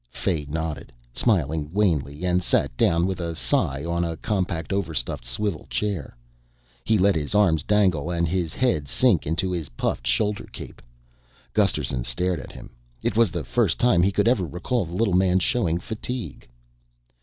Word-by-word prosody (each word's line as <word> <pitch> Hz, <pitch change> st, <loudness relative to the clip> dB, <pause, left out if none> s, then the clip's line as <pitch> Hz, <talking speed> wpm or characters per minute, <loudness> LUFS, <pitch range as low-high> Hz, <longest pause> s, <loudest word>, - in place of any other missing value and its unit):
Fay 80 Hz, +2 st, -2 dB
nodded, 80 Hz, 0 st, -4 dB, 0.2 s
smiled 90 Hz, -, +2 dB, 0.2 s
wanly 80 Hz, -5 st, 0 dB
and 90 Hz, 0 st, +2 dB
sat 85 Hz, -, +1 dB
down 85 Hz, +7 st, +3 dB
with 95 Hz, 0 st, -2 dB
a 85 Hz, -1 st, -3 dB
sigh 70 Hz, +2 st, 0 dB
on 85 Hz, +1 st, 0 dB
a 85 Hz, -1 st, -3 dB
compact 95 Hz, -5 st, -2 dB
overstuffed 80 Hz, -13 st, -2 dB
swivel 80 Hz, -, -3 dB
chair. 95 Hz, -12 st, -3 dB, 0.7 s
He 110 Hz, -, +2 dB
let 100 Hz, +1 st, +4 dB
his 80 Hz, +3 st, -2 dB
arms 90 Hz, -7 st, +4 dB
dangle 95 Hz, -6 st, +2 dB
and 85 Hz, -1 st, 0 dB
his 85 Hz, -1 st, -1 dB
head 120 Hz, -, 0 dB
sink 100 Hz, -, +2 dB
into 85 Hz, +4 st, 0 dB
his 85 Hz, -5 st, -3 dB
puffed -, -, -2 dB
shoulder 105 Hz, -, 0 dB
cape. -, -, -10 dB, 0.7 s
Gusterson 60 Hz, -2 st, +1 dB
stared 85 Hz, +9 st, -1 dB
at -, -, -9 dB
him. -, -, -11 dB, 0.3 s
It -, -, 0 dB
was 115 Hz, -2 st, +4 dB
the -, -, -4 dB
first 110 Hz, -9 st, +1 dB
time 120 Hz, -7 st, +4 dB
he 95 Hz, +3 st, +3 dB
could 105 Hz, +3 st, +1 dB
ever 115 Hz, -6 st, +3 dB
recall 90 Hz, -, -1 dB
the 85 Hz, +2 st, -7 dB
little 100 Hz, -1 st, +1 dB
man 90 Hz, 0 st, +4 dB
showing 85 Hz, -3 st, +1 dB
fatigue. 115 Hz, -, -6 dB
90 Hz, 165 wpm, -24 LUFS, 80-100 Hz, 0.7 s, let